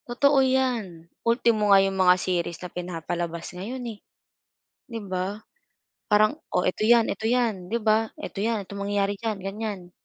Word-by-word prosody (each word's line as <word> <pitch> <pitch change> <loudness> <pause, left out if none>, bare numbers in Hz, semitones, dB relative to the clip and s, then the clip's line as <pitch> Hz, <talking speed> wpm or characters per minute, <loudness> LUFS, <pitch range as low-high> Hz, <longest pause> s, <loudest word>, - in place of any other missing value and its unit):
Totoo 280 +3 +4
yan, 245 -10 0 0.2
ultimo 230 -2 +2
nga 200 - +8
yung 195 - -1
mga 180 0 +6
series 175 -2 -2
na 180 - -9
pinapalabas 170 -1 -4
ngayon 235 +8 -6
eh, 205 - -17 0.9
'di 230 -2 -5
ba? 190 +4 -3 0.6
Parang 215 +7 +3 0.2
o 180 - +3
eto 200 +4 0
yan, 235 0 +5
eto 220 +3 -3
'yan, 225 -6 +1
'di 225 +6 -1
ba, 220 +1 +2
eto - - -8
'yan, 220 +1 0
ito 200 +1 -9
mangyayari 200 0 -1
diyan 220 -2 -3
ganyan. 195 -2 -5
205 Hz, 160 wpm, -25 LUFS, 185-230 Hz, 0.9 s, nga